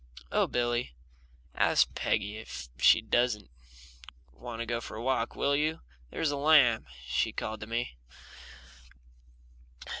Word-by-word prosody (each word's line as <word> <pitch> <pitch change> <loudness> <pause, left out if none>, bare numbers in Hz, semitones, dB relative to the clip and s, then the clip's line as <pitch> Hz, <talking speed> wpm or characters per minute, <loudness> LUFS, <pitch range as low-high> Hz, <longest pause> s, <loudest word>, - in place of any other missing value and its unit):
"Oh, - - +2
Billy, 120 - -1 0.6
ask - - +3
Peggy 105 +2 -1
if 65 - -8
she - - +6
doesn't 115 - 0 0.8
want 115 - -8
to 115 - -2
go 120 0 -2
for 110 - -8
a 115 - -6
walk, 125 -3 0
will 140 0 +1
you? 155 +2 0 0.3
There's 155 - -1
a 145 - -2
lamb," 140 -6 +5 0.2
she 60 0 0
called 110 0 -4
to 105 - -6
me. 115 - -3
120 Hz, 130 wpm, -30 LUFS, 110-130 Hz, 0.8 s, she